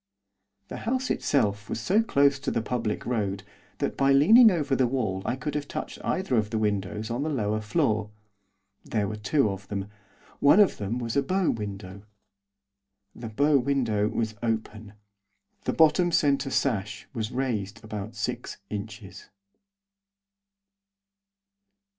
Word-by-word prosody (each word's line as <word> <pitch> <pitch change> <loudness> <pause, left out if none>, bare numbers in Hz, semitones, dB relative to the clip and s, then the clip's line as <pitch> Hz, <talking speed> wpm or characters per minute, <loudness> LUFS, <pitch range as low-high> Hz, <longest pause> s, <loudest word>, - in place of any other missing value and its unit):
The - - -6
house 260 +1 0
itself 105 -6 0
was - - -3
so 190 - +2
close 140 -9 +3
to 135 - -3
the 115 - -1
public 115 -3 -2
road 100 -5 -2 0.3
that - - -2
by 135 0 +3
leaning 220 - +8
over 150 -8 0
the 130 -2 +2
wall 110 -7 -1
I 120 - 0
could 135 +3 -4
have 145 -1 -3
touched - - -6
either 185 -10 0
of 105 -1 +1
the 110 - -2
windows 105 0 -2
on 120 +3 -2
the 155 - -1
lower 110 -6 -1
floor. 110 -2 0 0.7
There 105 -3 -1
were 105 - -4
two 110 +2 +1
of 95 0 -8
them. 100 -1 -4 0.5
One 145 +8 +6
of 205 - +4
them 105 +4 -3
was 115 -2 -3
a 140 - +4
bow 185 +5 +1
window. 100 -3 -6 1.1
The 115 -2 -7
bow 145 +6 +3
window 120 -6 +1
was 110 -1 -2
open. 110 -2 -3 0.7
The - - 0
bottom 160 +2 +4
centre 140 -3 +2
sash 110 -7 -1
was 110 -4 -3
raised 115 -5 -3
about 110 +1 -6
six 105 - -4
inches. 105 -1 -7
115 Hz, 145 wpm, -27 LUFS, 105-140 Hz, 1.1 s, leaning